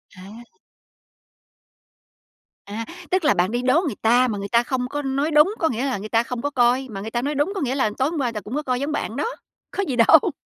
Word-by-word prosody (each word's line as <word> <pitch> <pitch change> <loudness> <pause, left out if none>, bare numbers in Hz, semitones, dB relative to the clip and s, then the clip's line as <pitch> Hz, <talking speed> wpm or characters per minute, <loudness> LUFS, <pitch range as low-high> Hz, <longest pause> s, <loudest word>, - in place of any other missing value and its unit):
À. 205 +6 -12 2.2
À, 215 +3 -5 0.3
tức 370 -1 +2
là, 295 - +5
bạn 180 +1 +1
đi 240 +1 -1
đố 260 +7 +3
người 270 -9 -2
ta 245 +3 +4
mà 210 - -2
người 200 0 -4
ta 235 +2 +3
không 250 0 -2
có 290 - -3
nói 275 +3 -1
đúng, 300 +7 +5
có 325 - +2
nghĩa 245 +2 -2
là 265 -5 -1
người 210 +2 -7
ta 230 +1 +2
không 240 0 -5
có 285 - -1
coi, 255 -1 +2
mà 195 - -6
người 220 +2 -6
ta 240 - -1
nói 290 +3 -2
đúng 290 +7 +1
có 385 - -2
nghĩa 265 -1 -1
là 260 -6 +1
tối 265 +2 +1
hôm 325 -1 -4
qua 245 -4 0
ta 215 - -4
cũng 220 +8 -6
có 300 - 0
coi 255 -3 -1
giống 285 +2 -2
bạn 240 -6 -3
đó, 290 - -1 0.5
có 400 - -1
gì 265 - -1
đâu. 255 - +5
255 Hz, 260 wpm, -22 LUFS, 230-290 Hz, 2.2 s, là